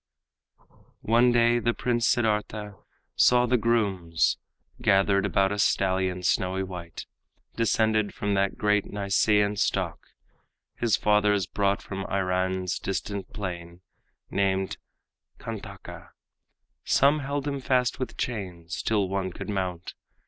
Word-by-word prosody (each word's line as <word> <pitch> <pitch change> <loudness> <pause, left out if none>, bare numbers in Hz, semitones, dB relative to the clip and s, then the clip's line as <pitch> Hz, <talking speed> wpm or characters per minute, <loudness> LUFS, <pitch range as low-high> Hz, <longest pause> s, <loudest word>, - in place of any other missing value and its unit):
One 120 +3 +4
day 120 0 +4
the 120 0 0
Prince 120 -2 0
Siddartha 105 -2 0 0.4
saw 125 0 +5
the 125 +1 +2
grooms 100 -8 +1 0.4
Gathered 100 -2 +3
about 95 0 +2
a 105 - -3
stallion, 95 -2 +1
snowy 95 +1 +1
white, 90 -3 -8 0.5
Descended 110 -2 +1
from 105 -1 -2
that 100 0 0
great 105 -1 +2
Nisaean 100 +1 +1
stock 100 - 0 0.8
His 115 -5 +1
fathers 105 -1 +2
brought 100 +1 0
from 95 0 -5
Iran's 95 -1 -1
distant 95 0 -4
plain, 90 -4 -6 0.5
Named 95 -1 0 0.6
Kantaka. - - -8 0.7
Some 140 +3 +3
held 140 0 -3
him 140 -1 -2
fast 130 0 +1
with 130 - -5
chains 90 -7 -4
Till 105 -3 +1
one 95 0 -2
could 90 - -8
mount. 90 -3 -3
100 Hz, 115 wpm, -26 LUFS, 95-115 Hz, 0.8 s, saw